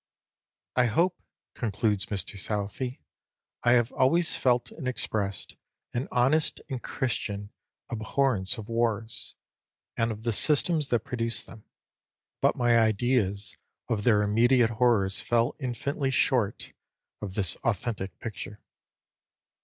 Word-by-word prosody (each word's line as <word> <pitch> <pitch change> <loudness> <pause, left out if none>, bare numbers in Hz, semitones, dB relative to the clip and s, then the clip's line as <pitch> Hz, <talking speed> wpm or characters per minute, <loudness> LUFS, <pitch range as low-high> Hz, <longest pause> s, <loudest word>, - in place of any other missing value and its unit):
'" - - -66
"I 125 - +4
hope 170 +11 +1 0.3
(concludes 105 -2 0
Mr 100 -1 -3
Southey), 105 +6 -2 0.6
I 120 - +5
have 120 0 +3
always 165 +6 +3
felt 125 -1 +1
and 140 -5 -6
expressed 100 -6 -2 0.4
an 125 +3 -2
honest 135 +6 +2
and 130 -2 -3
Christian 105 -6 -3 0.4
abhorrence 110 -3 +1
of 110 -2 -7
wars, 115 -1 -2 0.6
and 115 0 +1
of 110 0 -7
the 115 -1 0
systems 150 - +3
that 120 -2 +1
produce 115 -2 0
them; 110 -2 -13 0.8
but - - +3
my 120 -1 +4
ideas 110 -3 +1 0.3
of 105 -3 0
their 105 -3 +4
immediate 120 +3 +4
horrors 110 -5 +2
fell 120 0 +1
infinitely 135 +2 -2
short 120 -5 +1 0.5
of 95 -2 -5
this 95 -6 +1
authentic 100 -4 -2
picture." 105 -1 -7
115 Hz, 120 wpm, -28 LUFS, 105-125 Hz, 0.8 s, I